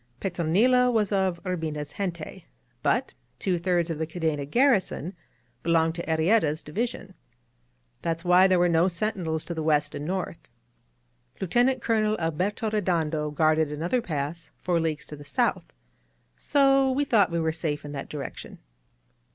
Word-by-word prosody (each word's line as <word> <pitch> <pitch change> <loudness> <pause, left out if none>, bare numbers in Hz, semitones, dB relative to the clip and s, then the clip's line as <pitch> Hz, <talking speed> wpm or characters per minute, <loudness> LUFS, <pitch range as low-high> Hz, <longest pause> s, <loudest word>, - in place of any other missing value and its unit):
Petronilo 200 +9 +3
was 215 -4 +1
of 190 -3 +1
Urbina's 155 -5 -3
gente; 170 -5 -5 0.4
but - - +1 0.2
two 180 -3 0
thirds 175 -1 +1
of 155 - -4
the 160 - -1
Cadena 160 -4 -2
garrison 205 - +2 0.5
belonged 165 -1 +2
to 170 0 -5
Arrieta's 160 -1 +2
division. 225 +11 -4 0.9
That's 165 +1 -3
why 180 +2 +6
there 185 -1 +3
were 175 0 +4
no 170 +1 +3
sentinels 175 -4 -2
to 170 - -4
the 160 - -3
west 150 -2 +1
and 145 - -5
north. 185 -2 -3 1.0
Lieutenant 245 +7 +1
Colonel 215 -2 +1
Alberto 185 +7 -1
Redondo 165 -7 0
guarded 155 0 +2
another 170 +12 -1
pass 155 -1 -4
four 175 -2 0
leagues 160 -2 -2
to 150 - -9
the 145 - -11
south, 240 - 0 0.7
so 275 -2 +3
we 285 +3 +1
thought 215 -8 +4
we 170 0 -1
were 160 -1 +1
safe 155 -3 -3
in 145 - -6
that 140 -2 -6
direction. 145 -2 -7
170 Hz, 150 wpm, -26 LUFS, 160-205 Hz, 1.0 s, why